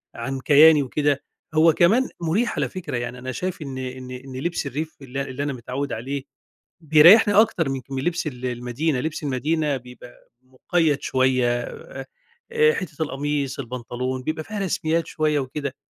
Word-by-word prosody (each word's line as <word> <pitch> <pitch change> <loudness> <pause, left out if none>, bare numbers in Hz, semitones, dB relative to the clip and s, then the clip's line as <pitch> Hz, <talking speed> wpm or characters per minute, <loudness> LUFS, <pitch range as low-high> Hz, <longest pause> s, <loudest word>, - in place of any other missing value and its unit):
عن 135 +3 -4
كياني 150 +1 +6
وكده، 145 +1 0 0.3
هو 160 0 +5
كمان 225 +12 +3
مريح 190 +9 0
على - - 0
فكرة 185 -9 -5
يعني، 120 +1 -5
أنا 130 +1 -5
شايف 180 +7 -4
إن 135 -3 -6
إن 130 0 -6
إن 130 +1 -9
لبس 170 +1 -2
الريف 155 +4 -5
اللي 135 +1 -5
اللي 135 +1 -4
أنا 145 -1 -2
متعوّد 130 +4 -4
عليه، 135 +4 -4 0.6
بيريحني 165 +8 +7
أكتر 200 -8 +3
من 135 -1 -3 0.2
لبس 175 -2 -1
ال 130 -2 -6
المدينة، 125 +4 -1
لبس 155 +2 -4
المدينة 145 +2 0
بيبقى 125 -1 -14
مُقيّد 145 +3 0
شوية، 130 -2 +1 0.9
آآ 460 0 +4
حتة 160 -4 -5
القميص، 140 -1 -2
البنطلون 125 +1 -4
بيبقى 155 +1 -3
فيها 210 +3 -6
رسميات 165 -3 0
شوية 155 -2 0
وكده، 140 +1 -4
140 Hz, 155 wpm, -23 LUFS, 130-160 Hz, 0.9 s, بيريحني